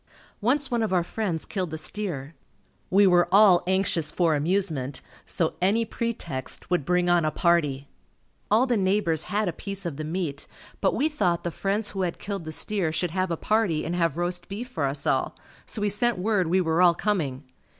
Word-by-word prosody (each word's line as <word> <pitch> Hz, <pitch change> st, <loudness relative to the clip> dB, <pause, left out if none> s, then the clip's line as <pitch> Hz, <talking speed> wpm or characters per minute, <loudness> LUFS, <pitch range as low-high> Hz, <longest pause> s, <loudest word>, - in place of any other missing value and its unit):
Once 270 Hz, +6 st, +1 dB
one 240 Hz, -1 st, +1 dB
of 220 Hz, -, -1 dB
our 180 Hz, -2 st, +2 dB
friends 180 Hz, -3 st, -3 dB
killed 185 Hz, -5 st, -3 dB
a -, -, -4 dB
steer. 155 Hz, -5 st, -3 dB, 0.6 s
We 200 Hz, +2 st, +5 dB
were 175 Hz, -2 st, +4 dB
all 195 Hz, -3 st, +6 dB
anxious 185 Hz, -4 st, +1 dB
for 170 Hz, -3 st, +2 dB
amusement 150 Hz, -4 st, -1 dB, 0.2 s
so 165 Hz, -2 st, 0 dB
any 210 Hz, +5 st, +2 dB
pretext 180 Hz, -, -4 dB
would 175 Hz, -6 st, +1 dB
bring 180 Hz, +1 st, +2 dB
on 175 Hz, -1 st, +3 dB
a 155 Hz, -, +2 dB
party. 150 Hz, -5 st, +1 dB, 0.6 s
All 225 Hz, +5 st, +4 dB
the 245 Hz, -3 st, +1 dB
neighbors 190 Hz, -5 st, +1 dB
had 210 Hz, 0 st, -1 dB
a 175 Hz, -, -1 dB
piece 195 Hz, +1 st, -4 dB
of 160 Hz, -5 st, -4 dB
the 155 Hz, -, -4 dB
meat 160 Hz, -2 st, -3 dB, 0.3 s
but -, -, +2 dB
we 300 Hz, -, +2 dB
thought 190 Hz, -, 0 dB
the 175 Hz, -, -2 dB
friends 200 Hz, +4 st, -1 dB
who 195 Hz, -, -3 dB
had 175 Hz, -2 st, -2 dB
killed 195 Hz, -4 st, -5 dB
the 155 Hz, -, -5 dB
steer 185 Hz, 0 st, 0 dB
should 170 Hz, +1 st, -1 dB
have 185 Hz, +1 st, -1 dB
a 165 Hz, -, -2 dB
party 210 Hz, -8 st, +1 dB
and 170 Hz, -, -2 dB
have 170 Hz, -3 st, 0 dB
roast 175 Hz, 0 st, -3 dB
beef 215 Hz, +5 st, -5 dB
for 160 Hz, -, -2 dB
us 140 Hz, +1 st, -2 dB
all, -, -, 0 dB, 0.3 s
so 215 Hz, -, -2 dB
we 210 Hz, -, +2 dB
sent 235 Hz, +2 st, +2 dB
word 190 Hz, -2 st, +1 dB
we 185 Hz, +3 st, +2 dB
were 165 Hz, 0 st, +1 dB
all 175 Hz, -2 st, +6 dB
coming. 155 Hz, -11 st, -1 dB
180 Hz, 200 wpm, -26 LUFS, 160-205 Hz, 0.6 s, all